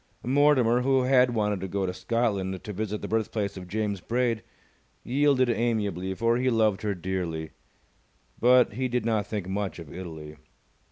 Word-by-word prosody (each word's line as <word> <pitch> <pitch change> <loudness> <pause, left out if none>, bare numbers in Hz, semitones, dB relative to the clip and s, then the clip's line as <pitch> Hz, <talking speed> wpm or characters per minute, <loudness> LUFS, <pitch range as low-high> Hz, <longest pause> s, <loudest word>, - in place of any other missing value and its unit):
Mortimer, 130 -3 +4
who 135 0 +2
had 125 -2 +4
wanted 105 -2 0
to 95 - -3
go 95 +1 -1
to 90 - -2
Scotland 100 -4 -1
to 105 - -6
visit 105 +1 -4
the - - -3
birthplace 110 -2 -1
of 90 -2 -8
James 100 0 -2
Braid, 120 0 0 0.6
yielded 135 0 +2
amiably, 105 -6 -1
for 115 +3 +2
he 130 +1 +1
loved 110 -4 +2
her 105 -2 -1
dearly. 85 -3 -3 0.9
But 125 -2 +5
he 130 +4 -1
did 125 -2 -1
not 110 -3 0
think 105 -4 -4
much 95 0 -3
of 80 -4 -10
Italy. 80 -4 -8
110 Hz, 165 wpm, -27 LUFS, 95-120 Hz, 0.9 s, But